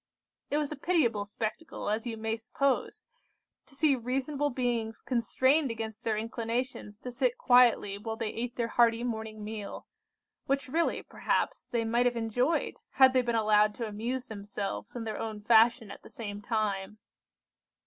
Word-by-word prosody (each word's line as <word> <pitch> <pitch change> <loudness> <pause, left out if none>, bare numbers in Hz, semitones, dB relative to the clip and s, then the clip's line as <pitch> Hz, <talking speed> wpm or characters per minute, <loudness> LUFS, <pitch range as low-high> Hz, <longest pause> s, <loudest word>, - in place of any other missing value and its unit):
"It 290 - +1
was 300 -1 -1
a - - -3
pitiable 270 - +1
spectacle, 220 +10 -5
as 220 +3 -1
you 225 -1 -4
may 220 0 -1
suppose, 260 +4 -1 0.6
to 275 - -17
see 295 -1 +4
reasonable 270 +4 -1
beings 240 -3 -1
constrained 260 +4 +2
against 225 -2 -5
their 220 -2 0
inclinations 230 -1 -3
to 250 - -6
sit 250 0 0
quietly 240 -5 +4
while 220 +1 -4
they 225 -1 -3
ate 240 +1 -4
their 235 -1 -1
hearty 235 0 +3
morning 220 -3 -4
meal, 210 -1 -6 0.6
which 275 +1 0
really, 330 +6 0
perhaps, - - -1
they 235 -2 -1
might 240 +2 +3
have 245 - 0
enjoyed, 245 +8 0 0.2
had 265 -1 +6
they 255 - +4
been 235 -1 -1
allowed 210 -1 +4
to 230 - -3
amuse 235 +5 -3
themselves 200 0 -5
in 240 - -3
their 220 -1 -4
own 220 -2 -4
fashion 225 0 +4
at - - -10
the - - -14
same 205 -3 -6
time. 210 -2 -2
230 Hz, 165 wpm, -30 LUFS, 220-255 Hz, 0.6 s, had